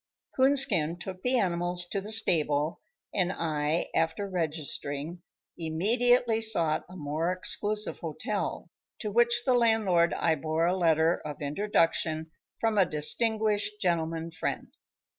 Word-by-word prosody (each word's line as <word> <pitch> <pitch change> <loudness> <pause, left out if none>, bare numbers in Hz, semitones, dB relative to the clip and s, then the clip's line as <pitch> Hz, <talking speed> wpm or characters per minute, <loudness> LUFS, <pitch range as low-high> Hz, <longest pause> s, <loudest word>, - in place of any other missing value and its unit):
Coonskin 255 - +4
took 185 +1 -8
the 250 +3 +1
animals 175 -3 0
to 195 +3 -4
the 210 +2 -5
stable, 155 -7 +2 0.3
and 185 -2 0
I, 155 -1 -2
after 165 +5 -1
registering, 160 -2 -4 0.4
immediately 225 +8 +2
sought 170 -9 +2
a 185 - -12
more 155 +1 -2
exclusive 210 +3 0
hotel, - - -4 0.3
to 210 - -5
whose 240 +1 +3
landlord 220 -9 +2
I 165 - +1
bore 160 +2 -1
a 180 +2 +1
letter 165 -2 +2
of 150 -1 -7
introduction 160 -1 0 0.3
from 225 -2 +1
a 190 - +5
distinguished 210 +6 +1
gentleman 165 -3 -1
friend. - - -4
175 Hz, 120 wpm, -28 LUFS, 160-215 Hz, 0.4 s, a